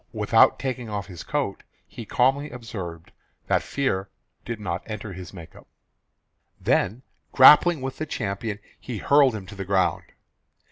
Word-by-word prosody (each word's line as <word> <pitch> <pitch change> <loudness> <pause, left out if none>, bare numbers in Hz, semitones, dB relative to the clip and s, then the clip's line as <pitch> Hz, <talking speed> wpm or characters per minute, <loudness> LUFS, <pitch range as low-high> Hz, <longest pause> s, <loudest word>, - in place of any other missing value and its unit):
Without - - +4
taking 125 -3 -4
off 100 -1 -4
his 90 -4 -9
coat - - -2 0.2
he 115 - -10
calmly 135 +6 +1
observed 95 -9 -8 0.3
that - - +1
fear 100 -9 -2 0.3
did 115 -2 -5
not 85 -3 -3
enter 105 -2 -6
his 90 -1 -9
make 85 -4 -12
up; - - -16 0.9
then 110 +8 0 0.3
grappling 150 +4 +7
with 135 0 -5
the 155 - -3
champion 105 -4 -3 0.2
he 120 -3 -6
hurled 140 +1 +4
him 100 -3 -7
to 105 - -11
the 100 -1 -6
ground. 95 -1 +1
110 Hz, 150 wpm, -24 LUFS, 95-130 Hz, 0.9 s, grappling